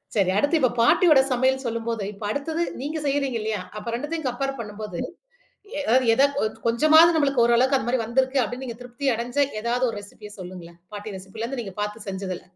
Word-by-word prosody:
சரி 190 -3 +3
அடுத்து 290 +7 +2
இப்ப 255 - +3
பாட்டியோட 300 +3 +6
சமையல் 260 +2 +1
சொல்லும்போது, 230 -2 -2
இப்ப 205 +1 -11
அடுத்தது 320 +5 -2 0.2
நீங்க 300 +3 -3
செய்யுறீங்க 275 -3 0
இல்லையா? 215 -2 -2 0.2
அப்ப 230 - -5
2தயும் 295 +3 -3
கம்பேர் 270 +2 -3
பண்ணும்போது, 210 -4 -6 0.8
எ - - -1 0.3
ஏதாது 280 +4 +4
ஒச் 215 - -3
கொஞ்சமாது 310 +8 +6
நம்மளுக்கு 275 -5 +3
ஓரளவுக்கு 255 +3 +4
அந்த 240 - -4
மாரி 255 - +1
வந்திருக்கு 260 +2 +2
அப்படின்னு, 245 +4 -5
நீங்கத் 235 0 -7
திருப்தி 250 +3 -3
அடைஞ்ச 240 +4 -4 0.2
ஏதாது 245 +2 +1
ஒரு 220 - -7
ரெசிபி 205 +1 -12
சொல்லுங்களேன். 175 -2 -10
பாட்டி 205 0 -6
ரெசிபில 195 +4 -7
இருந்து 260 +1 -4
நீங்கப் 195 -1 -7
பாத்து 210 +1 -4
செஞ்சதுல. 190 -1 -5
240 Hz, 180 wpm, -24 LUFS, 210-275 Hz, 0.8 s, பாட்டியோட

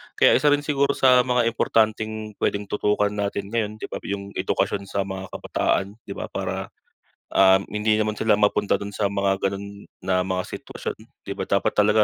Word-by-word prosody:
Kaya - - +5
isa 150 - +2
rin 145 0 +4
siguro 140 -1 +1
sa 125 -1 +6
mga 125 -1 +3
importanteng 110 -2 0
puwedeng 100 0 -1
tutukan 105 0 +1
natin 100 0 -3
ngayon 110 -2 -1
'di - - -6
ba, - - -4
yung 100 0 -4
edukasyon 100 +1 -1
sa 100 -1 0
mga 95 -1 -6
kabataan 100 +1 -1
'di 100 - -8
ba - - -3
para, - - -3 0.7
um, 95 0 +5
hindi 105 +1 +2
naman 110 0 -1
sila 110 -2 +4
mapunta 105 0 +2
dun 100 0 -5
sa 100 0 0
mga 100 -1 0
ganun 100 +1 -7 0.2
na 90 0 +1
mga 95 -1 -1
sitwasyon - - -6 0.3
'di - - -6
ba? - - -2
Dapat - - +2
talaga 105 +1 +4
105 Hz, 185 wpm, -24 LUFS, 100-110 Hz, 0.7 s, sa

